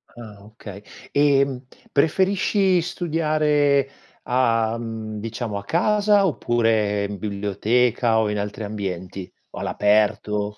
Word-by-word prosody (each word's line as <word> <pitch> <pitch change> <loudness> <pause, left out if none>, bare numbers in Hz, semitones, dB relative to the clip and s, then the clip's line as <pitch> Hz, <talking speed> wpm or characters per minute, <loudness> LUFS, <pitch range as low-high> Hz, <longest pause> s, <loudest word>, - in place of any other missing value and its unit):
Ah 105 -4 -12
okay 105 -2 -11 0.3
e, 145 -1 +4
mhmm, 130 -1 -7 0.3
preferisci 190 +4 +2
studiare 150 -5 +1 0.3
a 115 -3 +1
mhmm, 110 -2 -6
diciamo 110 -1 -4
a 100 - -6
casa 205 - +2
oppure 115 - +1
in 100 0 -4
biblioteca 110 +4 0
o 110 -1 +1
in 105 0 -2
altri 105 +2 -5
ambienti 95 -3 -6 0.2
o - - -8
all'aperto 105 0 0
115 Hz, 115 wpm, -22 LUFS, 105-145 Hz, 0.3 s, e